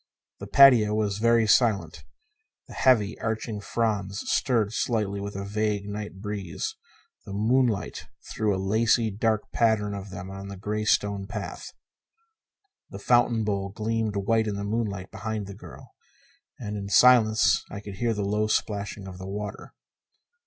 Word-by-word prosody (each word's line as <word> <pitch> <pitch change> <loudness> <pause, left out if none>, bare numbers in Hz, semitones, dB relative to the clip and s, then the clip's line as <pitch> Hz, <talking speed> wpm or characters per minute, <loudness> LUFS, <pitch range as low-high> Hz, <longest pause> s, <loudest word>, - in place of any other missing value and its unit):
The - - -7
patio 120 -6 +6
was 105 -2 -1
very 115 0 +4
silent. 110 -1 +2 0.6
The - - -11
heavy 110 -6 +2
arching 110 -1 -3
fronds 100 -3 -2
stirred 115 -5 +1
slightly 105 -5 -1
with 100 0 -6
a 100 0 -4
vague 105 0 -1
night 105 -1 -6
breeze; 100 -5 -4 0.5
the 100 - -9
moonlight 110 0 0 0.2
threw 110 -1 -1
a 95 - 0
lacy 110 +3 +2
dark 110 +1 -1
pattern 110 -3 +1
of 100 0 -7
them 95 0 -8
on 95 0 -8
the 100 0 -8
gray 105 +2 -3
stone 100 -2 +1
path. 100 - -6 1.2
The - - -8
fountain 120 -2 +2
bowl 100 -2 -2
gleamed 110 +1 -2
white 110 +3 +1
in 105 - -2
the 100 - -4
moonlight 100 -3 -3
behind 110 0 -4
the 100 - -8
girl, 90 -9 -13 0.7
and 105 -3 -5
in 100 -1 -5
the 100 - -7
silence 115 -3 +5
I 100 - -6
could 100 -2 -9
hear 115 +1 0
the 105 -1 -2
low 105 +2 0
splashing 105 -2 -2
of 95 -1 -9
the 95 - -7
water. 105 +1 -6
105 Hz, 160 wpm, -26 LUFS, 100-110 Hz, 1.2 s, patio